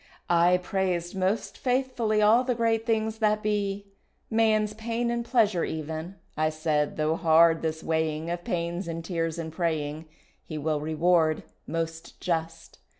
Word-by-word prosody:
I 175 +1 +5
praised 180 -1 -2
most 190 +3 -1
faithfully 250 -5 +1
All 225 +4 +5
the 250 -1 0
great 225 0 +1
things 220 -1 0
that 215 -1 +2
be, 205 -1 -1 0.5
Man's 215 -1 +2
pain 230 +2 -2
and 235 0 -1
pleasure 220 -7 +2
even, 160 +3 -4 0.2
I 155 0 +1
said 155 -1 -1
though 155 +1 +1
hard 165 0 +5
this 160 0 -3
weighing 160 0 -1
Of 175 0 -4
pains 170 +1 -2
and 165 0 -5
tears 165 -3 -2
and 160 -1 -5
praying 160 -2 -2 0.4
He 155 - -6
will 150 0 -1
reward 160 +1 +2 0.2
most 165 0 -4
just. 165 -1 -3
175 Hz, 150 wpm, -27 LUFS, 160-215 Hz, 0.5 s, I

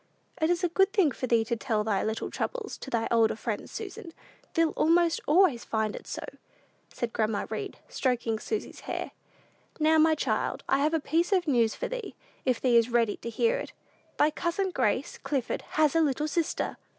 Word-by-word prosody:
"It 315 - +3
is 350 +1 +1
a - - +4
good 385 +4 +3
thing 380 -10 +4
for 255 - -4
thee 230 -2 +3
to 235 - -1
tell 220 -1 -1
thy 210 -3 0
little 220 +1 -2
troubles 465 -4 -3
to - - -8
thy 230 -3 0
older 230 -2 +4
friends, 220 -1 -4
Susan: 400 -4 -7 0.4
thee'll 330 -1 +3
almost 335 +1 +3
always 305 -6 +4
find 220 -1 -1
it - - -9
so," - - -5 0.7
said 240 -2 -4
grandma 215 -2 0
Read, - - -4
stroking 240 -4 -1
Susy's 430 - -4
hair. - - -3 0.7
"Now, 315 +1 +4
my 315 0 +5
child, - - -1
I 270 - +3
have 305 +3 +2
a - - +2
piece 330 +6 0
of 365 -3 +2
news 235 -6 +3
for - - -3
thee, - - -6 0.3
if 255 -3 +2
thee 245 -2 +4
is 230 +1 +3
ready 230 -3 +2
to 235 - -6
hear 465 - +1
it: - - -7 0.4
thy 300 - +4
cousin, 365 +4 -1
Grace 255 -2 0
Clifford, 270 -3 -2
has 305 -1 +3
a 330 - +5
little 300 0 +1
sister." 320 +2 -1
295 Hz, 195 wpm, -28 LUFS, 230-340 Hz, 0.7 s, my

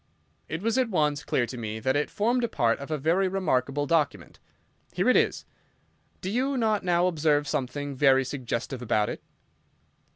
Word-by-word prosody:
It 160 +5 -5
was 230 +3 +1
at 255 -3 +1
once 150 -6 0
clear 120 - 0
to 125 0 -8
me 110 -1 -4
that 130 +4 0
it 145 - 0
formed 235 +2 0
part 115 -1 +1
of 140 - -8
a 155 - -1
very 170 +7 +2
remarkable 145 -7 0
document. 155 -2 -1 0.5
Here - - 0
it - - +5
is. - - +1 0.8
Do 185 - -3
you 265 +4 0
not 220 -3 +1
now 175 -1 +2
observe 150 -4 +1
something 140 +2 -3
very 135 -1 +4
suggestive 125 -1 -4
about 105 -3 +1
it?" - - -6
150 Hz, 170 wpm, -27 LUFS, 130-190 Hz, 0.8 s, it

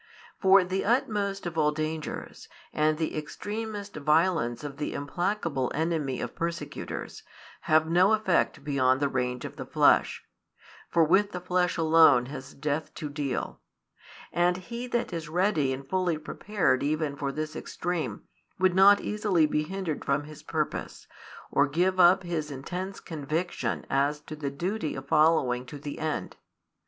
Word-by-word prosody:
For 190 0 +6
the 185 +2 -2
utmost 210 -5 0
of 170 -2 -3
all 150 -1 +3
danger, 155 0 -4 0.5
and 155 0 +2
the 160 -1 -2
extremest 205 +6 -5
violence 150 -4 +2
of 140 -2 -6
the 150 - -3
implacable 150 -2 -1
enmity 155 -4 -1
of - - -4
persecutors, 170 0 -5 0.5
have 155 0 +5
no 180 +5 +4
effect 210 -5 +1
beyond 130 -3 +2
the 140 - +2
range 125 -2 -2
of - - -8
the - - -5
flesh; - - +3 0.6
for 170 - +4
with 195 +6 +3
the 180 - -3
flesh 180 0 0
alone 160 -6 +6
has 135 -1 -8
death 150 +2 -2
to 150 - -5
deal: 145 -2 -3 0.7
and 175 +1 +2
he 235 +6 -6
that 240 -1 -2
is 165 -2 -4
ready 165 -5 +1
and 135 +1 -5
fully 180 -1 0
prepared 185 -2 0
even 150 0 -1
for 140 -1 -2
this 155 +2 -4
extreme, 175 0 -3 0.3
would 185 -1 +3
not 200 +2 +7
easily 205 -6 +1
be 150 0 0
hindered 175 -1 -4
from 140 +1 0
his 155 0 -11
purpose, - - -3 0.5
or 140 - +3
give 180 +6 +1
up 185 +2 +6
his 165 -4 -3
intense 180 +8 -5
conviction 160 +2 -3
as 140 +2 +1
to 155 +1 -9
the 145 -2 -3
duty 170 +4 -3
of 135 +1 -7
following 150 -6 +3
to 135 +4 -9
the 145 0 -7
end. 155 -1 -3
160 Hz, 155 wpm, -28 LUFS, 145-185 Hz, 0.7 s, not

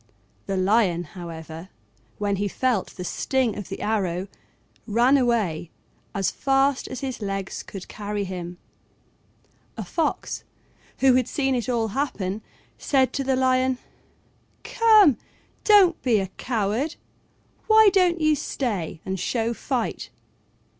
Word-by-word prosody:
The 195 - -1
Lion, 185 -3 +2
however, 165 0 -9 0.5
when 200 -1 -1
he 205 +1 0
felt 240 0 -1
the 180 - -4
sting 255 +5 0
of 205 -3 -7
the 195 - -6
arrow, 195 -4 -1 0.6
ran 240 +5 +4
away 220 - +1 0.5
as 195 -1 +1
fast 270 0 +1
as 260 - -6
his 260 -4 -4
legs 195 -1 -3
could 195 -2 -9
carry 205 -1 -4
him. 180 -2 -6 1.2
A - - -3
fox, 325 -2 -2 0.6
who 265 -1 +6
had 255 -1 +2
seen 270 -2 0
it 245 0 -1
all 230 -3 0
happen, 210 -5 -2 0.4
said 265 -2 +2
to 275 - -1
the 265 0 +1
Lion, 255 0 +2 0.9
"Come, 430 - +5 0.4
don't 390 -6 +5
be 240 -4 +3
a 190 -2 -1
coward: 235 +5 -2 0.7
why 440 -1 +7
don't 360 -3 +3
you 310 -1 +3
stay 205 - -3
and 190 0 -3
show 230 +4 -1
fight?" 245 0 -3
230 Hz, 130 wpm, -24 LUFS, 195-270 Hz, 1.2 s, why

